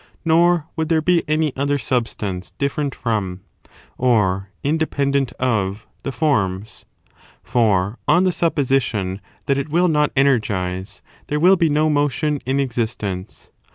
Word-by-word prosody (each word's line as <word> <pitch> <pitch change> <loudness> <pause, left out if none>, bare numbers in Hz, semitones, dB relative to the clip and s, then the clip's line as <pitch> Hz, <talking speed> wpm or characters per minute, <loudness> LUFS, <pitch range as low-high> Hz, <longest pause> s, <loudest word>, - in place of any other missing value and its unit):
327 165 0 +4
nor 175 -2 +3
would 160 -1 -2
there 165 -1 +3
be 170 +2 +2
any 155 -2 0
other 145 +1 0
substance 110 -9 -2
different 140 0 -1
from, 100 -6 -2 0.6
or 100 -6 +2
in 145 +3 +1
dependent 140 -4 0
of, 105 -5 -1 0.2
the 135 - -4
forms; 105 - -1 0.6
for, 105 -3 +1
on 175 +5 +4
the 185 - +3
supposition 130 - 0 0.2
that 140 -1 +1
it 140 - -4
will 175 +4 +3
not 150 -3 +2
energize, 100 -9 0 0.2
there 150 - -1
will 185 +4 +6
be 170 -3 +2
no 150 +1 +2
motion 145 0 0
in 135 +1 +1
existence. 110 -7 -3
135 Hz, 140 wpm, -20 LUFS, 105-155 Hz, 0.6 s, will